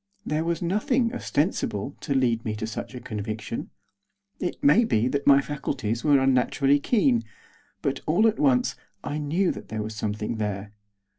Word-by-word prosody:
There 155 +1 0
was 170 0 -1
nothing, 230 +7 +1
ostensible, 145 - -1
to 140 - -2
lead 120 -3 +2
me 110 -1 -2
to 110 +1 -4
such 110 +3 -6
a - - -5
conviction; 110 -1 -5 0.7
it 180 - -2
may 280 -4 +6
be 120 - +2
that 140 +2 -2
my 140 -1 +7
faculties 130 -6 -3
were 145 -2 +5
unnaturally 135 +2 +3
keen; 140 - +2 0.6
but, - - 0
all 175 +8 +3
at 220 - 0
once, 135 -1 +3 0.3
I 150 - -3
knew 165 +6 +1
that - - -8
there 110 -1 -3
was 110 0 -6
something 105 +1 -3
there. 105 -1 -3
135 Hz, 165 wpm, -26 LUFS, 110-155 Hz, 0.7 s, my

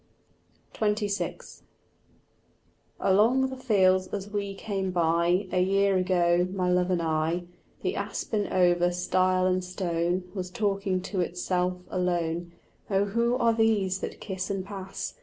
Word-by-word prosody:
XXVI 210 -1 -2 1.4
Along 235 +7 +3
the - - -5
fields 190 -7 +3
as 200 +1 -5
we 200 -1 -3
came 195 -2 -3
by 175 +2 +2
A 180 - +2
year 195 +1 +3
ago, 180 -1 +2
my 185 -2 0
love 180 0 +2
and 175 -2 +1
I, 160 +2 0 0.4
The - - -1
aspen 210 -3 -2
over 175 -1 +3
stile 185 +1 +1
and 185 0 +1
stone 180 -1 -1
Was 185 -3 -4
talking 195 -2 -1
to 190 0 -2
itself 180 +1 -1
alone. 175 -2 -1 0.4
"Oh 195 0 +2
who 235 +4 +1
are 235 -2 +3
these 210 -4 +2
that - - -6
kiss 190 -2 -4
and 195 -2 -2
pass? 195 -1 -6
185 Hz, 135 wpm, -27 LUFS, 180-200 Hz, 1.4 s, Along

